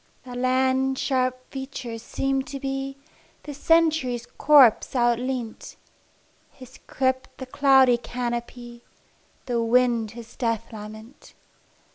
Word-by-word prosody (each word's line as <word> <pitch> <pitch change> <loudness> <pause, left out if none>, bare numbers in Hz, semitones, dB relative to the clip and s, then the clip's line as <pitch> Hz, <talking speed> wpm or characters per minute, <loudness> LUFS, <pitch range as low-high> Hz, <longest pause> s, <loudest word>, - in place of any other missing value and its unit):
The 250 -1 -10
land's 260 +1 +1
sharp 255 -1 -1
features 265 -4 -6
seemed 270 +3 -2
to 280 -2 -6
me 270 0 -4 0.5
The 295 - -7
Century's 300 -6 +1
corpse 275 -3 +4
outleant, 240 -1 -1 0.8
Its 255 0 -13
crypt 260 -1 -2
the 260 - -7
cloudy 265 -2 +4
canopy, 240 0 -6 0.6
The 240 -2 -1
wind 235 -2 +2
its 235 -1 -11
death 230 -2 -2
lament. 215 +4 -11
255 Hz, 105 wpm, -24 LUFS, 240-270 Hz, 0.8 s, corpse